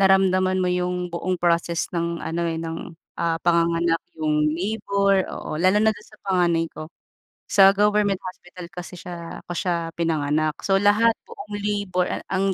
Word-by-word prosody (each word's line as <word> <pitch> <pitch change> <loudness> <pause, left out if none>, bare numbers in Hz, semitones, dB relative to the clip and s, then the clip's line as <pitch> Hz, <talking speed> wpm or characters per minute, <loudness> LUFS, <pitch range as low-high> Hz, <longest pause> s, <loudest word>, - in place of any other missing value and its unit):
naramdaman 190 -1 +4
mo 180 - +1
yung 180 0 -1
buong 185 +2 -1
process 170 -1 +1
ng 170 0 -1
ano 170 +1 -2
eh, 165 - -2
ng, 165 0 -6 0.3
ah, 165 -1 +1
panganganak. 170 -1 +2 0.2
Yung 150 -1 +2
labor, 200 +1 +1
oo, - - -5
lalo 185 +3 +4
na 220 0 +4
dun 210 - -14
sa 215 - -18
panganay 175 -3 +2
ko. 155 0 -8 0.6
Sa 195 -1 +8
government 205 -1 +2
hospital 180 -1 -9
kasi 180 -1 -8
siya 170 -2 -8
ko - - -6
siya 170 -2 -1
pinanganak. 155 -1 0
So, 195 -1 +3
lahat 220 +3 +4
buong 205 0 -8
labor 200 -3 0
a - - -4
ang 195 0 +1
180 Hz, 165 wpm, -23 LUFS, 170-195 Hz, 0.6 s, Sa